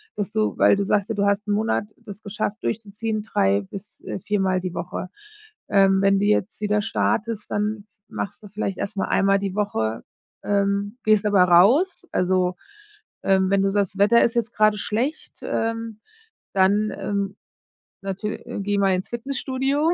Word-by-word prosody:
dass 205 0 -3
du 215 -1 0
weil - - +5
du 200 - 0
sagst 205 +1 +1
ja, 225 - -1
du 200 - +1
hast 200 +1 +1
'n 205 - 0
Monat 215 0 +1
das 205 +1 -11
geschafft 205 +1 -4
durchzuziehen. 215 0 -3
3 100 - +1
bis, 195 - -11
äh, - - -4
4 205 +2 -1
Mal 185 -1 +1
die 180 -1 -4
Woche. 180 +1 -5 0.6
Ähm, 195 -1 +4
wenn 195 0 +4
du - - 0
jetzt 210 0 0
wieder 210 0 +1
startest, 200 - -1
dann 210 0 -1 0.2
machst 200 - -5
du - - -9
vielleicht 195 -1 -3
erstmal 200 -1 -3
einmal 195 0 +3
die 195 -1 -3
Woche, 115 - -1 0.4
ähm, 200 +2 0
gehst 215 -1 +3
aber 200 -3 +5
raus. 245 - +4
Also, 180 0 +1 0.7
ähm, 190 -1 +3
wenn 200 - +3
du 195 - +2
sagst, 200 -2 0
das - - -10
Wetter 225 +4 +5
ist 235 - +1
jetzt 235 0 -1
gerade 215 0 +3
schlecht, 245 +10 -3
ähm, 225 -1 -2 0.5
dann, 200 +3 +3
ähm, 200 0 -2 0.7
natür 195 +2 -4
äh, - - -5
geh 205 +1 -1
mal 195 -1 +3
ins 185 +1 -2
Fitnessstudio 270 +4 -1
205 Hz, 175 wpm, -23 LUFS, 195-215 Hz, 0.7 s, weil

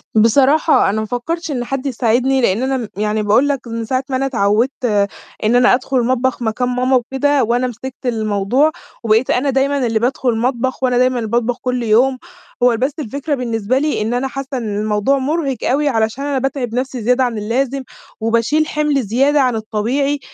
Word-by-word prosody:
بصراحة 270 +6 +4
أنا 215 - -1
ما - - -3
فكّرتش 320 +8 -3
إن 250 -4 -2
حد 270 +2 -4
يساعدني، 255 +1 +1
لإن 225 +1 +1
أنا 265 0 0
م 235 -4 -4
يعني 215 0 0
باقول 215 +7 +3
لك 275 -3 -2
من 230 0 -4
ساعة 255 +3 -1
ما 260 - -1
أنا 265 +1 0
اتعوّدت 235 +2 0 0.6
إن 220 +3 +2
أنا 245 +1 +5
أدخل 260 +1 0
المطبخ 255 +1 0
مكان 235 +2 -1
ماما 250 +1 +1
وكده، 270 +3 +1
وأنا 240 +3 +1
مسكت 250 +2 -7
الموضوع، 220 +5 +1 0.3
وبقيت 225 +2 +2
أنا 275 +3 +1
دايمًا 270 0 +1
اللي 225 -1 0
بادخل 250 +2 0
المطبخ، 245 +3 -1
وأنا 250 -1 +2
دايمًا 255 0 +2
اللي 225 -2 -4
باطبخ 235 +1 0
كلّ 250 -1 -1
يوم، 245 +4 +3 0.5
هو 245 -2 +4
بس 260 +5 0
الفكرة 285 +3 -3
بالنسبة 235 -1 -1
لي 295 -3 0
إن 220 +3 -1
أنا 250 +2 -1
حاسّة 270 0 -5
إن 215 -4 -3
الموضوع 210 +5 +1
مُرهِق 275 -1 -1
أوي، 290 +2 +2
علشان 225 +2 -1
أنا 285 -1 -1
باتعب 260 -3 -3
نفسي 255 -1 -3
زيادة 250 +4 +2
عن 240 -3 -1
اللازم، 255 +5 -1 0.4
وباشيل 230 +7 +1
حِمل 300 -3 0
زيادة 270 +7 +2
عن 250 -3 +1
الطبيعي، 235 +7 -1
250 Hz, 190 wpm, -17 LUFS, 230-270 Hz, 0.6 s, أنا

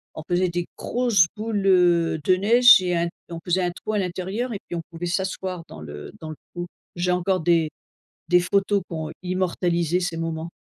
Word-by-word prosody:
on 155 - -6
faisait 180 +1 +2
des 175 0 -3
grosses 235 -8 +2
boules, 215 -2 -2
heu, 175 -3 +4
de 185 - +4
neige 235 +4 +7
et 180 -1 0
un 170 0 0 0.2
on 165 -1 -6
faisait 180 +1 +1
un 175 - 0
trou 215 +4 -6
à - - +1
l'intérieur 190 +6 -3
et 200 - -4
puis - - -5
on 165 - -3
pouvait 175 +1 -5
s'asseoir 185 0 -3
dans 80 - -11
le 75 -1 -8
dans 160 - -6
le 155 - -6 0.2
trou. 175 0 -5 0.3
J'ai 180 +1 0
encore 180 +1 +1
des 165 -1 +2 0.6
des 180 0 +5
photos 200 +2 +1
qui - - -7
ont 160 -1 -4
immortalisé 180 -2 0
ces 175 -2 -2
moments. 165 0 -4
180 Hz, 205 wpm, -24 LUFS, 170-190 Hz, 0.6 s, neige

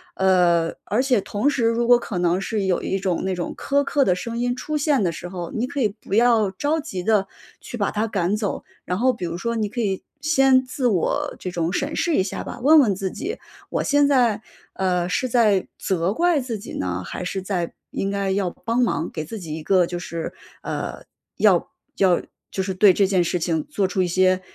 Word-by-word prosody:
呃， 175 -3 +3
而 215 +5 +1
且 255 -5 +3
同 210 +10 0
时 260 -5 0
如 230 +1 +2
果 245 0 +7
可 210 -5 -5
能 175 +1 +2
是 205 +1 -2
有 185 -2 +1
一 195 - -1
种 185 -2 -1
那 190 -1 -1
种 175 - -4
苛 280 +1 +1
刻 280 0 +2
的 180 - +3
声 230 +5 -5
音 245 +1 0
出 305 +4 -3
现 285 -5 +2
的 175 - +1
时 170 - -7
候， 175 -2 -6
你 235 +3 -1
可 285 +1 -3
以 215 - +3
不 205 -1 -10
要 225 -2 +4
着 290 +11 0
急 195 - -5
地 205 -1 +2 0.3
去 240 - -8
把 205 - 0
它 220 +2 -1
赶 195 -1 0
走。 210 -2 -3 0.2
然 180 - -1
后 255 +3 +3
比 205 -7 -5
如 170 0 -4
说 235 +4 -2
你 215 - 0
可 235 +4 -4
以 195 -4 -1 0.2
先 270 -5 +4
自 255 0 -1
我 185 -7 0
这 185 - -5
种 170 0 -1
审 285 +2 -1
视 335 - +1
一 185 - +3
下 190 - -4
吧， 245 - -7
问 310 +4 +7
问 215 -9 +3
自 190 -1 -3
己， 400 - -5 0.3
我 - - -1
现 290 0 +3
在， 240 -6 +3 0.3
呃， 180 -2 0
是 255 - 0
在 220 -6 +3
责 185 0 0
怪 340 +3 +2
自 245 -4 -4
己 200 - -9
呢？ 90 0 -2
还 180 - -5
是 190 +1 -3
在 185 -3 -2 0.2
应 195 - -2
该 200 -1 -1
要 190 -2 0
帮 230 +6 -3
忙 165 -9 0
给 155 -2 -4
自 220 +7 -7
己 160 -4 -6
一 160 - -7
个 185 +1 +4
就 175 - -4
是 165 -1 -5 0.3
呃， - - -5 0.3
要 - - +4 0.3
要 185 -3 +3 0.3
就 190 - -2
是 190 0 -2
对 195 0 +6
这 195 +1 +3
件 185 -3 +2
事 175 +1 -1
情 160 -2 -1
做 195 -2 0
出 185 0 0
一 180 - 0
些， 185 +1 +2
200 Hz, 245 characters per minute, -23 LUFS, 180-245 Hz, 0.3 s, 果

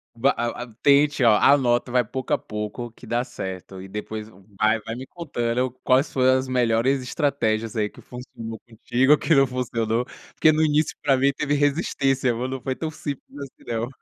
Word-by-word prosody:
Va 130 +4 +3
a 120 +1 -3
a - - -10
tente, 145 -1 +4
ó 115 - +7
anota, 125 -3 +3
vai 125 0 +3
pouco 130 +4 -4
a - - +4
pouco, 105 +3 -6
que - - -15
dá 120 +1 0
certo. 95 -6 -7
E 95 - -9
depois 105 +2 -6
v - - -20 0.2
vai 110 +1 +3
vai 115 +2 -6
me 130 +2 -7
contando 125 -6 -2
quais 135 +4 +3
foram 130 0 +3
as 130 - -3
melhores 125 +1 +2
estratégias 120 -5 -1
aí 105 -2 0
que - - -16
funcionou 115 -3 -9
contigo 125 +5 +2
que 160 - +2
não 135 0 +6
funcionou, 120 -2 -1 0.3
porque 155 - +4
no 155 +1 +2
início, 155 0 +1
pra 140 -2 +4
mim 135 +2 +3
teve 145 +1 -2
resistência, 140 -3 +1
viu, 125 +2 -3
não 130 -1 -5
foi 130 +1 -2
tão 160 +2 -4
simples 145 -2 -7
assim, 140 -2 -10
não. 115 +1 -1
125 Hz, 195 wpm, -24 LUFS, 115-140 Hz, 0.3 s, ó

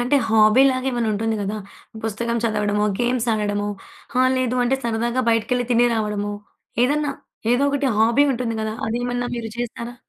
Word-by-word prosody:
అంటే 250 +4 +2
హాబీ 220 +3 +5
లాగా 260 +1 -1
మరుంటుంది 225 -1 0
గదా! 205 +2 -2 0.5
పుస్తకం 235 +2 -2
చదవడము, 210 -2 +1 0.2
గేమ్స్ 245 0 0
ఆడడము, 205 -1 -1 0.5
ఆ! - - +5
లేదు 255 -1 0
అంటే 260 +2 +2
సరదాగా 235 +2 0
బయటికెళ్లి 230 +2 +1
తిని 240 +1 +4
రావడము, 210 -2 -2 0.5
ఏదన్నా 290 +2 0 0.4
ఏదో 245 +3 +2
ఒకటి 280 -1 0
హాబీ 235 +6 +4
ఉంటుంది 235 -2 -2
గదా! 220 0 -3
అదేమన్నా 245 +1 -2
మీరు 230 -2 -5
చేస్తారా? 240 0 -5
235 Hz, 150 wpm, -22 LUFS, 215-245 Hz, 0.5 s, హాబీ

